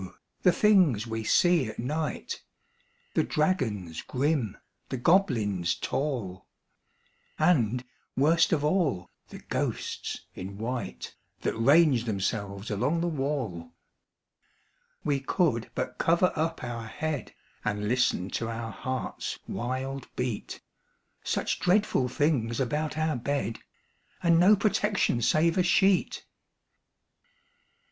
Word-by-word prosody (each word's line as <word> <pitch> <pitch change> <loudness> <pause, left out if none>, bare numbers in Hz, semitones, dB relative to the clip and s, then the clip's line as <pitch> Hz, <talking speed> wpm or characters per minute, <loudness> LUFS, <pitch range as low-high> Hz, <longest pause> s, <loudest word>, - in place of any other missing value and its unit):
the 180 - +5
things 175 - +4
we 115 -1 -4
see 175 +2 +3
at 110 - -8
night 150 +6 -3 0.7
The - - +3
dragons 110 - -1
grim, 135 -5 -1 0.3
the 130 - -2
goblins 115 - +2
tall, 120 -11 -3 0.9
And, 125 -8 +2 0.3
worst 160 +5 +4
of 150 -3 +1
all, 150 - 0 0.2
the - - -9
ghosts - - -3
in 95 +2 -7
white 110 - -4 0.3
That - - 0
range 140 +1 +4
themselves 100 -1 -2
along 130 +11 0
the 175 - 0
wall! 135 - -3 1.3
We 145 -2 +1
could 135 - 0
but 125 - -3
cover 170 +2 +3
up 165 +1 -1
our 115 -2 -5
head, 150 0 -4 0.3
And 105 0 -1
listen 115 -5 +1
to 115 - -2
our 115 0 -4
heart's 130 +5 -4
wild 130 +3 -3
beat 125 -4 -3 0.6
Such - - -1
dreadful 185 -8 +2
things 125 -4 0
about 150 +4 -1
our 155 -1 +1
bed, 120 -3 -2 0.6
And 170 -1 +5
no 195 +5 +7
protection 205 - +1
save 165 +8 +3
a - - +4
sheet! 190 +1 +2
130 Hz, 110 wpm, -28 LUFS, 115-160 Hz, 1.3 s, no